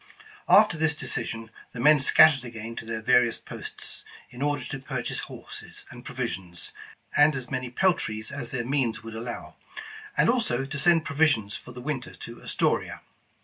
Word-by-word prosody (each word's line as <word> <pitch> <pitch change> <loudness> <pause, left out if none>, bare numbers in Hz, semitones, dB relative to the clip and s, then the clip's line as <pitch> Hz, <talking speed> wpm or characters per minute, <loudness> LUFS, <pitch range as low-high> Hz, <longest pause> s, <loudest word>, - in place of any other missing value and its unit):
After 205 -6 +6
this 160 -1 +3
decision, 115 -5 -4 0.2
the 115 - -7
men 150 +4 +6
scattered 135 0 +6
again 115 -1 -7
to - - -5
their 110 -1 -4
various 120 -1 +4
posts, - - -6 0.3
in 125 +1 -10
order 145 -3 0
to 135 - -5
purchase 130 -2 -3
horses - - -9
and - - -11
provi - - -3
sions, 85 -1 -6 0.4
and 145 0 +6
as 125 -3 -6
many 130 -1 -2
peltries 120 - 0
as 140 -4 -4
their 125 -3 -3
means 125 -4 0
would 115 0 -8
al 110 - -4
low, 120 0 -7 0.6
and - - +5
also 225 - +2
to 140 +1 -5
send 165 +2 +4
provisions 140 -9 +2
for - - -8
the 125 0 -9
winter 135 -2 -4
to 115 0 -9
As - - -2
toria. - - 0
125 Hz, 180 wpm, -27 LUFS, 115-145 Hz, 0.6 s, After